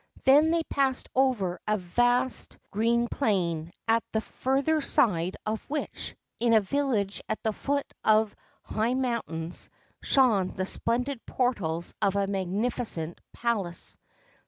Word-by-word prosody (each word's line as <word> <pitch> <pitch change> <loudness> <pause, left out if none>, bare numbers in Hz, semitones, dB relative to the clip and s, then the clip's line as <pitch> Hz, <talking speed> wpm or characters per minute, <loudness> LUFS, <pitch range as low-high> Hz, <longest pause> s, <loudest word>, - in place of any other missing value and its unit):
Then 290 +4 +6
they 330 0 +2
passed 270 -4 0
over 240 -9 +1
a 215 0 +2
vast 245 +7 +1
green 235 +3 +2
plain, 175 - 0 0.2
at 225 +1 +4
the 220 - +1
further 275 +7 0
side 185 -10 +2
of 215 +4 -3
which, 300 +1 -4 0.2
in 235 -1 +3
a 220 - +7
village 215 -3 -1
at - - -2
the 220 - 0
foot 280 +5 -1 0.2
of 215 0 +3 0.3
high 225 +4 0
mountains, 230 -10 -2 0.3
shone 230 -9 +4
the 185 0 -3
splendid 245 +5 -1
portals 175 -10 -1
of 200 -2 +2
a 200 0 +2
magnificent 195 -2 -2
palace. 205 -8 -1
225 Hz, 130 wpm, -28 LUFS, 195-260 Hz, 0.3 s, a